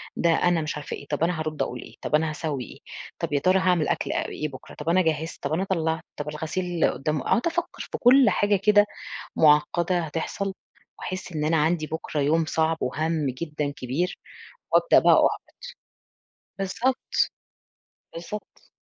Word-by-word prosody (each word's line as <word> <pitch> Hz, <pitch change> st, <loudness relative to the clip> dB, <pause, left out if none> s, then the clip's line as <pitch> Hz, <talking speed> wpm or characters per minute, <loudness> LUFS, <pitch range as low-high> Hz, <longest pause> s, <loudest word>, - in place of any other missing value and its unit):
ده 170 Hz, -, +2 dB
أنا 170 Hz, 0 st, +3 dB
مش 155 Hz, 0 st, -3 dB
عارفة 150 Hz, -, -5 dB
إيه، 140 Hz, -, -12 dB
طب 150 Hz, +2 st, -1 dB
أنا 170 Hz, -1 st, +1 dB
هارُدّ 155 Hz, -2 st, -3 dB
أقول 125 Hz, -2 st, -2 dB
إيه، -, -, -12 dB
طب -, -, +1 dB
أنا 155 Hz, 0 st, +2 dB
هاسوّي 150 Hz, -4 st, -3 dB
إيه، -, -, -13 dB, 0.4 s
طب -, -, -3 dB
يا 140 Hz, -, +3 dB
ترى 185 Hz, +4 st, +3 dB
هاعمل 180 Hz, -4 st, +2 dB
أكل -, -, -1 dB
آآ -, -, -1 dB
إيه 155 Hz, -, -3 dB
بكرة، 130 Hz, -, -11 dB
طب 150 Hz, +2 st, -4 dB
أنا 185 Hz, +2 st, +4 dB
جهِّزت، 160 Hz, -1 st, -2 dB
طب 140 Hz, +2 st, -1 dB
أنا 180 Hz, -, +1 dB
طلَّعت، 160 Hz, -3 st, 0 dB
طب 150 Hz, 0 st, -4 dB
الغسيل 170 Hz, +3 st, -1 dB
قدّامه 150 Hz, 0 st, -2 dB
أقعد 240 Hz, -, +2 dB
أفكَّر 345 Hz, +1 st, -3 dB
في -, -, -2 dB
كل 250 Hz, -1 st, +6 dB
حاجة 205 Hz, 0 st, +2 dB
كده 205 Hz, 0 st, +6 dB, 0.5 s
معقَّدة 160 Hz, +4 st, +4 dB
هتحصل، 165 Hz, +5 st, -3 dB, 0.5 s
وأحسّ 185 Hz, -1 st, -5 dB
إن 150 Hz, -1 st, -2 dB
أنا 160 Hz, +1 st, +2 dB
عندي 155 Hz, +1 st, +1 dB
بكرة 160 Hz, -1 st, -3 dB
يوم 160 Hz, +3 st, +2 dB
صعب 160 Hz, +1 st, +1 dB
وهمّ 155 Hz, +3 st, -1 dB
جدًا 150 Hz, +1 st, -3 dB
كبير، 140 Hz, +9 st, -2 dB, 0.5 s
وأبدأ -, -, +5 dB
بقى -, -, +6 dB
أُحبَط. -, -, -4 dB, 1.1 s
بالضبط، 235 Hz, +7 st, 0 dB, 1.2 s
بالضبط. 175 Hz, +5 st, -8 dB
160 Hz, 170 wpm, -25 LUFS, 150-185 Hz, 1.2 s, كل